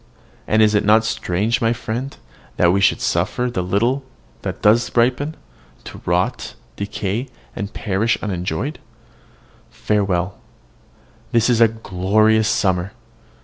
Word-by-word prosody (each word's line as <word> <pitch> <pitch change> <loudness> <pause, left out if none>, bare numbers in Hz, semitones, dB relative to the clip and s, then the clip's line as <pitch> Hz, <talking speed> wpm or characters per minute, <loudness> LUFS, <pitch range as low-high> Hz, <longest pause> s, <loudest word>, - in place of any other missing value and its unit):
and 110 +1 +4
is 105 0 +4
it 105 - +2
not 110 +2 +4
strange, 110 +4 -1
my 115 0 +2
friend, 125 +3 -5 0.4
that 85 - +4
we 100 - +2
should - - +3
suffer 115 +8 0
the 90 - -1
little 115 +9 0 0.4
that - - -5
does 110 +3 +4
really 120 +2 +5
ripen, 145 +5 -6 0.5
to - - -10
rot, - - -1 0.2
decay, 100 +4 -3 0.3
and 100 +2 -5
perish 105 +2 0
unenjoyed? 95 - -3 0.9
Farewell! 100 -3 -1 0.9
This 120 +1 +3
is 120 -1 +2
a 115 - +8
glorious 110 +1 +1
summer. 95 -2 0
110 Hz, 130 wpm, -20 LUFS, 95-115 Hz, 0.9 s, a